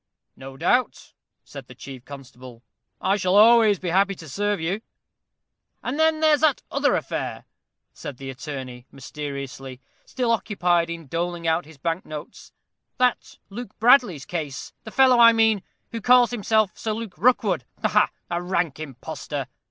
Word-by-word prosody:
"No 135 0 -11
doubt," 245 - 0 0.3
said 140 -3 -11
the 125 - -13
chief 130 -1 -10
constable; 125 -3 -12 0.4
"I 195 +2 +1
shall 185 -1 +1
always 220 -1 +6
be 180 0 -4
happy 195 +3 +2
to 160 - -12
serve 205 +7 -1
you." 180 +6 -2 1.0
"And 270 +5 -3
then 315 0 +3
there's 310 -2 +4
that 305 -4 +2
other - - +2
affair," - - -4 0.5
said 135 - -8
the 135 0 -7
attorney, 130 -2 -8
mysteriously, 135 -2 -7 0.2
still 250 -3 -2
occupied 175 -6 +1
in 170 -1 -6
doling 170 +3 -3
out 165 +2 +1
his 160 -1 -15
bank 165 +5 -2
notes, 150 -1 -10 0.5
"that 250 -1 0
Luke 225 0 -8
Bradley's 225 - +4
case; 150 -6 -5
the - - -6
fellow, 255 -1 +5
I 230 0 +8
mean, 225 -3 +3 0.3
who 230 - -5
calls 245 +1 +5
himself 220 -3 +1
Sir 220 - -3
Luke 220 -4 -6
Rookwood 205 - +2 0.2
ha, - - +4
ha! - - +3 0.2
A 170 0 -1
rank 175 -5 -1
impostor! 140 -6 -6
180 Hz, 155 wpm, -24 LUFS, 140-225 Hz, 1.0 s, I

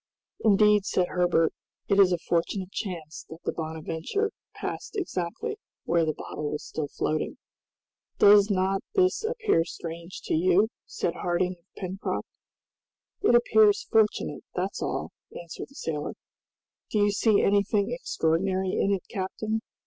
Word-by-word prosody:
"Indeed," 210 -1 +5
said 180 -1 +1
Herbert, 175 -2 +2 0.3
"it 200 -1 +3
is 190 -2 +7
a 175 - +2
fortunate 175 +3 -1
chance 165 -8 -5
that 160 +1 -11
the - - -1
'Bonadventure' 160 - -3 0.2
passed - - -5
exactly 360 - -3 0.3
where 170 -1 +2
the 155 - 0
bottle 150 -1 -5
was 150 - -4
still 155 -2 -3
floating!" 155 +2 -2 0.8
"Does 205 0 +7
not 195 0 +1
this 375 +3 +3
appear 440 - +2
strange 170 +1 -7
to - - -3
you?" 185 +6 +4 0.2
asked - - -4
Harding 180 +1 -1
of 170 - -37
Pencroft. 190 0 -3 0.9
"It 325 - +4
appears 220 -3 +5
fortunate, 220 -1 +2
that's - - -2
all," - - -2 0.3
answered 170 +6 -8
the 275 - -19
sailor. 155 - -3 0.8
"Do - - -1
you 205 0 +4
see 210 0 +3
anything 200 +2 +2
extraordinary 190 -4 0
in 195 - +1
it, 195 -2 0
captain? 215 +3 -3
190 Hz, 140 wpm, -27 LUFS, 170-210 Hz, 0.9 s, is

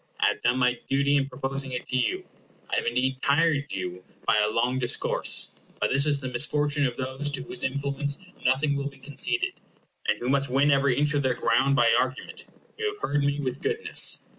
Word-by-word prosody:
I - - +3
have - - -4
done 120 +2 +2
my 125 -1 +1
duty 140 +1 +2
in 140 -1 +1
proposing 135 0 -2
it 125 - -5
to - - -2
you. 125 -4 0 0.5
I - - +1
have - - -1
indeed 130 +2 0
tired 145 0 +2
you 90 0 -5 0.2
by 105 - +3
a 105 0 +2
long 120 +4 0
discourse; 120 -1 +2 0.3
but - - 0
this 140 +2 +3
is 145 -1 +2
the 130 - -5
misfortune 145 +2 +2
of 125 - -6
those 130 +2 -2
to 135 -2 -2
whose 125 - -7
influence 140 +1 -1 0.3
nothing 140 +3 +2
will 140 0 -2
be 140 - -17
conceded, 245 - 0 0.5
and - - +2
who 120 - -4
must 140 0 +1
win 140 +3 +3
every 140 -2 +2
inch 150 +1 +3
of 145 - +1
their 130 -2 0
ground 130 +5 +2
by 120 -3 +4
argument. 130 0 -4 0.3
You 440 - 0
have 415 - -5
heard 145 0 +1
me 140 +1 0
with 130 -1 -4
goodness. 450 0 0
135 Hz, 210 wpm, -26 LUFS, 125-145 Hz, 0.5 s, by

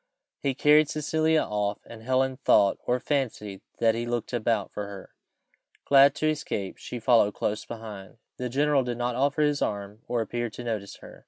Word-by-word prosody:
He 135 -2 -1
carried 150 +2 +5
Cecilia 155 +1 +1
off, 105 -1 -2
and 115 -1 -11
Helen 130 +2 0
thought, 100 -6 +3
or 125 +1 +2
fancied, 120 -8 -2 0.2
that 115 -1 +3
he 120 +1 -3
looked 120 0 -3
about 115 -3 0
for 105 -1 -5
her. 100 -2 -10 0.7
Glad 140 0 +6
to 155 - 0
escape, 105 -11 -4
she 125 - -6
followed 115 -3 +3
close 105 +1 -2
behind. 110 -4 -9 0.2
The 125 0 -3
general 140 +2 +2
did 120 -1 -4
not 120 0 -1
offer 140 +4 +1
his 145 -1 +1
arm 100 +1 -3
or 120 -1 0
appear 120 +1 -3
to 120 - -9
notice 110 -4 -4
her. - - -13
120 Hz, 180 wpm, -27 LUFS, 105-140 Hz, 0.7 s, Glad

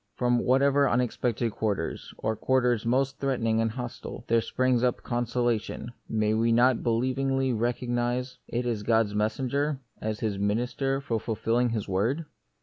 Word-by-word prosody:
From 125 -1 +2
whatever 140 +3 +3
unexpected 120 -1 0
quarters, 100 -6 -2
or 110 0 -1
quarters 125 -2 +1
most 135 +3 +1
threatening 115 -5 +1
and 115 - +1
hostile, 120 0 -6
there 115 0 +3
springs 130 +1 +1
up 125 -1 0
consolation, 120 -1 -1 0.2
may 110 -1 +1
we 115 +1 +2
not 120 +1 +4
believingly 130 +2 +1
recognise 120 +2 -1
it 120 +1 -2
as 115 -4 -1
God's 110 -1 +2
messenger, 130 +7 0 0.2
as 110 -1 -3
His 105 -3 -1
minister 125 +6 0
for 115 -5 -1
ful 110 0 -3
filling 120 +3 +1
His 110 -3 -2
word 115 - 0
120 Hz, 145 wpm, -27 LUFS, 110-130 Hz, 0.2 s, not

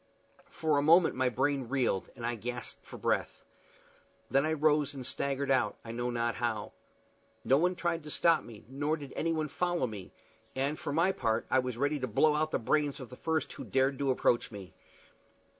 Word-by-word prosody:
For 155 -4 +1
a - - +2
moment 165 +4 +5
my 130 0 +1
brain 130 0 0
reeled, 125 -9 0
and 120 -2 -6
I 120 - 0
gasped 120 +1 -5
for - - -10
breath. - - -1 0.9
Then 135 +3 +3
I 160 - +1
rose 150 -2 +2
and 130 -2 -6
staggered 140 +1 -1
out, 130 -1 +2
I 115 - -6
know 120 +1 -2
not 120 -1 -1
how. 115 -3 -2 0.7
No 135 +2 +4
one 180 +2 +2
tried 170 -2 -1
to - - -7
stop 165 +2 +3
me, 110 -3 -12
nor 145 +4 -1
did 140 -3 -9
anyone 160 -1 0
follow 175 0 0
me; 105 -6 -7 0.4
and, 140 +3 -1
for - - -4
my 165 +6 +3
part, 115 -9 -1
I 130 - +5
was 125 -2 -3
ready 145 +3 0
to 130 - -2
blow 150 +7 +3
out 155 +1 +1
the - - 0
brains 145 +4 0
of 130 - -8
the 125 - -10
first 160 +3 -1
who - - -7
dared 135 0 +1
to 140 -1 0
approach 125 -2 +2
me. 100 -5 -10
135 Hz, 200 wpm, -31 LUFS, 125-155 Hz, 0.9 s, moment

